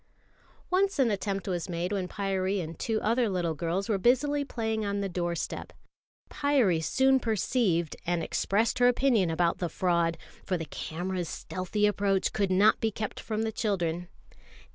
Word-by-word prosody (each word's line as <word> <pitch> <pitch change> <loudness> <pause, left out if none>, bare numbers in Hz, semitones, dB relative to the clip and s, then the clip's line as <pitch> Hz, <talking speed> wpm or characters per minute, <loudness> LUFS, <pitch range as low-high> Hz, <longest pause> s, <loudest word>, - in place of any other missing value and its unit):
Once 390 +1 +2
an 255 -5 +3
attempt 200 -1 -2
was 180 -2 -2
made 175 +2 -2
when 195 -3 -1
Pyârie 195 0 -1
and 165 -2 -6
two 220 -1 0
other 230 +1 +2
little 175 -4 -1
girls 170 +5 -2
were 210 -4 +1
busily 285 +6 +2
playing 220 -5 -2
on 200 0 -1
the 200 - -1
doorstep. 175 -2 -3 0.5
Pyârie 260 - +2
soon 265 +10 +3
perceived 210 - 0
and 175 -1 -1
expressed 220 +5 0
her 245 - +6
opinion 245 -7 +3
about 170 +1 +1
the 175 - -1
fraud 170 -1 +1 0.3
for 185 - -1
the 165 - -5
camera's 175 +2 -4
stealthy 185 +3 -2
approach 200 -2 +1
could 200 -2 +1
not 195 +3 +4
be 225 - +2
kept 215 0 -5
from 220 0 -2
the 220 - -1
children. 175 -6 -1
195 Hz, 165 wpm, -28 LUFS, 175-225 Hz, 0.5 s, her